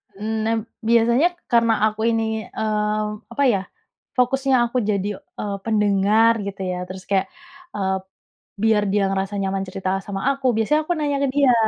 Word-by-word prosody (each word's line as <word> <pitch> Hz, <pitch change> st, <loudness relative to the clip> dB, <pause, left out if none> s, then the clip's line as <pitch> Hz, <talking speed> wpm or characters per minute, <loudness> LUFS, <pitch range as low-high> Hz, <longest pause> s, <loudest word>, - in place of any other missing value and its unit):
Mmm, 215 Hz, +3 st, -3 dB
nah, 225 Hz, +1 st, +2 dB, 0.3 s
biasanya 235 Hz, +6 st, +4 dB, 0.2 s
karena 230 Hz, -1 st, +4 dB
aku 215 Hz, 0 st, -4 dB
ini, 225 Hz, -1 st, +1 dB, 0.2 s
eee, 215 Hz, 0 st, -1 dB, 0.3 s
apa 280 Hz, -, +1 dB
ya, 195 Hz, -, +1 dB, 0.6 s
fokusnya 265 Hz, +1 st, +2 dB
aku 240 Hz, +2 st, -3 dB
jadi, 200 Hz, -1 st, 0 dB
eee, 200 Hz, -1 st, -6 dB
pendengar, 210 Hz, +1 st, +3 dB
gitu 195 Hz, -1 st, -6 dB
ya. 180 Hz, -, -3 dB
Terus 185 Hz, 0 st, -8 dB
kayak, 195 Hz, -1 st, +2 dB, 0.5 s
eee, 190 Hz, -1 st, 0 dB, 0.7 s
biar 220 Hz, -2 st, +4 dB
dia 205 Hz, 0 st, +2 dB
ngerasa 195 Hz, +1 st, -2 dB
nyaman 195 Hz, 0 st, -1 dB
cerita 185 Hz, 0 st, -4 dB, 0.2 s
sama 195 Hz, -1 st, -4 dB
aku, 275 Hz, -1 st, -2 dB
biasanya 300 Hz, +8 st, +2 dB
aku 350 Hz, -, 0 dB
nanya 290 Hz, -2 st, 0 dB
ke -, -, +2 dB
dia, 280 Hz, -3 st, +5 dB
215 Hz, 160 wpm, -22 LUFS, 200-235 Hz, 0.7 s, dia